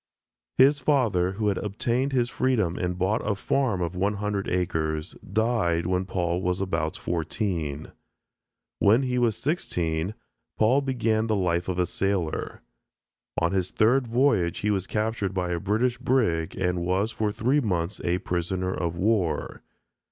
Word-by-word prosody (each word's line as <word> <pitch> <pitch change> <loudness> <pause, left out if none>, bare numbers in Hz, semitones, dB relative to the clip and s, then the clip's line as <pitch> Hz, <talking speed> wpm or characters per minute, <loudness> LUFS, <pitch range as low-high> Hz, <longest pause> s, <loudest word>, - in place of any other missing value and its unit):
His 140 +3 +6
father, 115 -11 +2
who 105 +1 0
had 100 - -1
obtained 120 +6 -1
his 125 -3 +2
freedom 120 -9 0
and 90 0 -2
bought 95 +5 +1
a 100 -1 0
farm 110 -3 0
of 85 +2 -3
one 100 +3 0
hundred 100 -1 -2
acres, 80 -3 -1 0.2
died 110 -7 +1
when 90 +1 0
Paul 90 -1 -1
was 90 0 0
about 80 -5 -1
fourteen. 80 -3 -3 0.9
When 110 +6 +5
he 125 -1 0
was 115 -3 +2
sixteen, 90 - -1 0.4
Paul 125 +6 +4
began 115 -5 0
the 110 - +1
life 90 -3 0
of 90 - -2
a 90 - +2
sailor. 95 -4 -2 0.8
On 85 0 +1
his 95 -2 0
third 120 +6 +3
voyage 115 -8 +2
he 105 - +1
was 95 -2 -1
captured 105 -3 -1
by 90 -1 -1
a 85 - -1
British 115 +6 0
brig 110 -12 +1
and 90 -1 0
was 95 +5 0
for 105 -3 -1
three 125 +8 +2
months 90 -4 -1
a 85 +1 +1
prisoner 90 +1 -2
of 85 -1 -2
war. 95 -2 0
95 Hz, 155 wpm, -26 LUFS, 90-115 Hz, 0.9 s, His